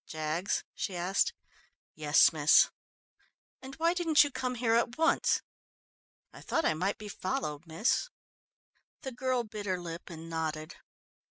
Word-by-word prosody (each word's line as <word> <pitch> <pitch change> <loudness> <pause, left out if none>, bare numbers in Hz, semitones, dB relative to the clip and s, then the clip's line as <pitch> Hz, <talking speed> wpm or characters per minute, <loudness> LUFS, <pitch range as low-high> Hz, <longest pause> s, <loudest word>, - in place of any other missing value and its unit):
"Jaggs?" 155 +4 -2
she 190 - -4
asked. 180 +3 +1 0.6
"Yes, 150 +1 +4
miss." 155 -1 +5 0.9
"And 270 +1 -9
why 335 +1 +2
didn't 330 -4 +4
you 290 - -3
come 255 -1 -3
here 230 -1 +1
at 235 +1 +1
once?" 320 0 +2 0.9
"I - - -12
thought 325 - -1
I - - +3
might 185 +6 -1
be 210 - -9
followed, 165 -5 -4
miss." 190 - 0 0.9
The 265 - -4
girl 255 0 -1
bit 210 -2 -7
her 185 -1 0
lip 170 0 -8
and 165 -1 -9
nodded. 160 -1 -4
190 Hz, 145 wpm, -30 LUFS, 160-255 Hz, 0.9 s, miss